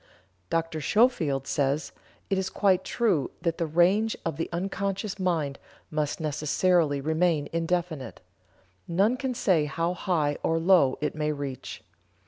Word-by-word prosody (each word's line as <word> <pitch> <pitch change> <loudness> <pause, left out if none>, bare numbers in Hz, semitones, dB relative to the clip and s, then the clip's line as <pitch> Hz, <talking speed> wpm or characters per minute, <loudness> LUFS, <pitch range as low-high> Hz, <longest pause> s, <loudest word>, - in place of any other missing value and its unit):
Dr. 165 -1 -1
Schofield 155 - +2
says: 140 +2 0 0.4
"It 195 - +2
is 190 0 -2
quite 190 -3 +2
true 205 - +1
that 170 0 -1
the 165 - 0
range 185 +8 +3
of 165 -3 -1
the 165 - -3
unconscious 195 +3 -3
mind 160 -7 -1 0.3
must 150 -1 -1
necessarily 155 0 +1
remain 160 +1 +1
indefinite; 165 -3 -2 0.7
none 195 +8 +2
can 255 -1 -3
say 185 -10 +2
how 165 +4 -1
high 160 -6 0
or 165 - +1
low 165 -6 +4
it 150 - -1
may 150 0 -1
reach.... 140 -3 -6
165 Hz, 135 wpm, -27 LUFS, 150-185 Hz, 0.7 s, low